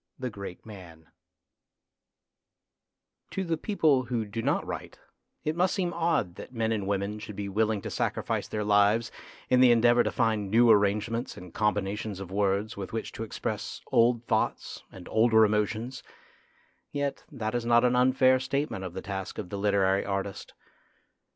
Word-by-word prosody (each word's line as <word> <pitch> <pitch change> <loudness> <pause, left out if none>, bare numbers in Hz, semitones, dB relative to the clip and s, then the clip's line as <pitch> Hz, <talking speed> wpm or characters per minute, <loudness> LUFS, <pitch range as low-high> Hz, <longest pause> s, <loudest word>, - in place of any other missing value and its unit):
THE 130 -2 -4
GREAT 100 -3 -8
MAN 85 -7 -12 2.2
To 195 - -3
the 165 -2 0
people 155 - +2
who 120 -2 -2
do 110 +2 -4
not - - 0
write - - -6 0.5
it 155 +1 -1
must 180 +2 +2
seem 175 -2 -1
odd 165 - 0
that - - -9
men 115 -1 0
and 105 -3 -1
women 100 +1 -2
should 105 -1 -8
be 100 0 -4
willing 105 +1 0
to - - -5
sacrifice - - -2
their 105 -1 -3
lives 105 +2 +3 0.4
in 125 - +3
the 130 -1 +7
endeavour 120 +1 +5
to - - 0
find 110 -4 0
new 115 +2 +5
arrangements 105 +4 +1
and 90 -1 -11
combinations 105 -1 -1
of 95 -2 -8
words 100 +1 0
with 100 -2 -6
which 115 - -3
to 115 - -6
express 110 - -4
old 120 0 +3
thoughts - - -1
and 90 -2 -11
older 110 0 +5
emotions, 110 +4 -1 0.9
yet 145 -1 -3
that 110 -6 -4
is 120 -1 -1
not 120 +1 +4
an 125 0 +3
unfair 130 +1 +4
statement 140 -6 -2
of 90 -2 -6
the - - -5
task 95 0 -5
of 90 - -5
the 100 - -4
literary 100 -1 +2
artist. 100 0 -4
110 Hz, 165 wpm, -28 LUFS, 100-120 Hz, 2.2 s, the